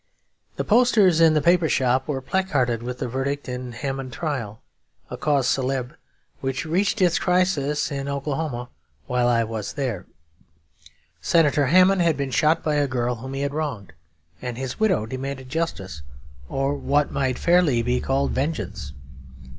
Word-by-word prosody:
The - - -2
posters 210 -7 +4
in 160 -1 +6
the 150 - +2
paper 170 -1 +4
shop 130 0 +1
were 140 -3 -2
placarded 130 -11 0
with 125 +1 -5
the 125 - -3
verdict 135 +3 -3
in 125 0 -5
the 115 - -10
Hamon 135 -1 -4
trial; 120 -6 -4 0.5
a - - -3
cause 145 -4 +1
célèbre 130 -1 -1 0.5
which 135 +2 -3
reached 190 +5 +1
its 175 -2 +3
crisis 180 -7 +1
in 140 0 -3
Oklahoma 140 -3 -3 0.4
while 125 -1 +1
I 115 -1 +3
was 110 -2 -5
there. 125 - -3 1.1
Senator 145 - +3
Hamon 185 +5 +5
had 165 -4 +2
been 140 -2 -2
shot 155 +5 +2
by 150 -1 +1
a 145 -1 +2
girl 125 -1 -1
whom 130 +4 -7
he 135 - -3
had 140 0 -2
wronged, 140 - -4 0.5
and 125 -2 -5
his 130 -1 -5
widow 190 - +2
demanded 130 +2 -6
justice, 115 - -3 0.5
or 135 +1 0
what 145 0 0
might 130 -2 -1
fairly 170 -9 +3
be 125 +1 +1
called 135 +1 0
vengeance. 105 - -3
135 Hz, 160 wpm, -23 LUFS, 125-155 Hz, 1.1 s, in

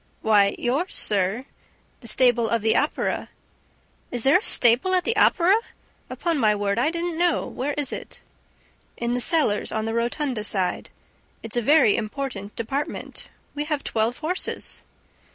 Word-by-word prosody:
"Why, 205 -2 +4
yours, 280 +10 -1
sir, 205 +5 +1 0.5
the 235 - -12
stable 240 0 +2
of 230 -2 0
the 220 0 +3
Opera." 295 - -1 0.8
"Is 245 -2 -2
there 275 +7 +5
a - - -13
stable 250 +11 +4
at 365 - +1
the 455 - 0
Opera? 355 +1 +4 0.6
Upon 335 -4 -2
my 215 -3 +3
word, 205 +1 -1
I 260 - +2
didn't 340 0 -3
know. 350 -1 +1
Where 280 +4 -4
is 290 -2 -2
it?" - - -8 0.8
"In 235 0 -2
the 245 - -1
cellars, 305 - +2
on 220 0 -2
the 225 - -3
Rotunda 240 0 -2
side. 190 -4 -2 0.5
It's 225 0 -7
a 240 - +1
very 280 -4 +4
important 215 -3 -5
department; 275 +7 -5 0.2
we 295 0 -3
have 300 -2 -2
twelve 225 +2 -1
horses." 355 +4 -3
245 Hz, 155 wpm, -23 LUFS, 220-300 Hz, 0.8 s, there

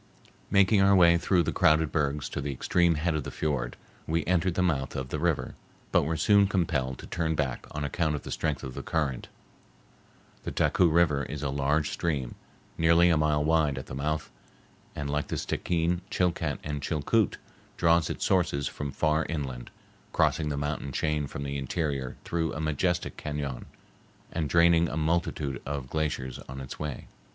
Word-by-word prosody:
Making 100 +1 +4
our 100 0 +6
way 85 -2 +6
through 90 0 +2
the - - -1
crowded 80 0 +3
bergs 75 -2 0
to - - -4
the 70 0 -2
extreme 85 +5 +2
head 80 +3 0
of 75 -2 -1
the - - -5
fiord, 70 -6 -2 0.3
we 80 +1 0
entered 90 -1 +1
the 90 - +2
mouth 70 -7 0
of 65 -1 -4
the 75 - -3
river, 80 -1 0 0.4
but - - +3
were 80 +1 -1
soon 100 +5 +5
compelled 75 -9 0
to - - -10
turn 80 -1 -1
back 70 -4 -2
on 75 - -4
account 75 +1 0
of 70 - -6
the - - -7
strength 80 -3 -2
of 65 - -6
the - - -5
current. 75 -6 -2 1.1
The - - -5
Taku 90 - +3
River 80 -3 +3
is 75 +2 -6
a 70 - -1
large 70 +2 +1
stream, 75 -8 -2 0.5
nearly 85 +1 +5
a 80 - +3
mile 75 -1 +2
wide 75 -3 +2
at 65 - -5
the - - -9
mouth, 75 +3 -2 0.6
and, 70 - -3
like 75 +1 -1
the - - -3
Stickeen, 85 0 -1
Chilcat, 85 -5 0
and 75 -1 -4
Chilcoot, 85 +8 +1 0.4
draws 85 -1 +3
its - - -2
sources 80 -8 +1
from 70 -1 -5
far 75 +3 +1
inland, 65 -6 -4 0.4
crossing 75 -1 +2
the 70 - -2
mountain 75 -1 -3
chain 75 +1 0
from 70 - -6
the 70 0 -3
interior 70 -2 -2
through 80 -2 -1
a - - -5
majestic 80 +3 -1
cañon, 75 -4 -4 0.7
and 80 -3 -2
draining 85 -1 +5
a 75 - -4
multitude 80 -3 -1
of 70 -2 -5
glaciers 75 -5 -2
on 65 +1 -6
its 65 -1 -8
way. 75 -4 -5
75 Hz, 180 wpm, -28 LUFS, 70-85 Hz, 1.1 s, our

